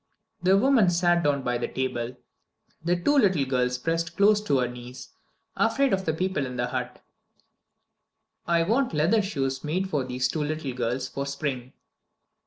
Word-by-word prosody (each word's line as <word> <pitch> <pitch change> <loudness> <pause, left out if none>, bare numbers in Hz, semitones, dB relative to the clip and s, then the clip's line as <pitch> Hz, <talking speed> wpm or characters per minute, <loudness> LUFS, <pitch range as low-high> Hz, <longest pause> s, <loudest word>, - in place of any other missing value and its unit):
The 190 +2 +4
woman 235 -4 +4
sat 175 0 +2
down 145 -3 +1
by 125 -1 -1
the - - -2
table. 125 -1 -3 0.7
The 175 +2 +2
two 285 +10 +3
little 185 - +3
girls 125 -1 0
pressed 165 +4 -2
close 210 +1 +5
to 140 - +2
her 125 -1 +1
knees, 125 +1 -10 0.5
afraid 270 +3 +2
of 190 0 0
the 160 - +1
people 185 -6 -1
in 125 - -7
the 120 - 0
hut. 125 -1 -5 1.4
"I 170 -1 +3
want 235 - +1
leather 175 +9 +3
shoes 135 -9 -2
made 185 +5 -2
for 145 -5 0
these 125 0 -1
two 150 +4 -2
little 150 -3 -3
girls 125 +1 -2
for 140 0 -5
spring." 140 -3 -4
150 Hz, 170 wpm, -26 LUFS, 125-185 Hz, 1.4 s, close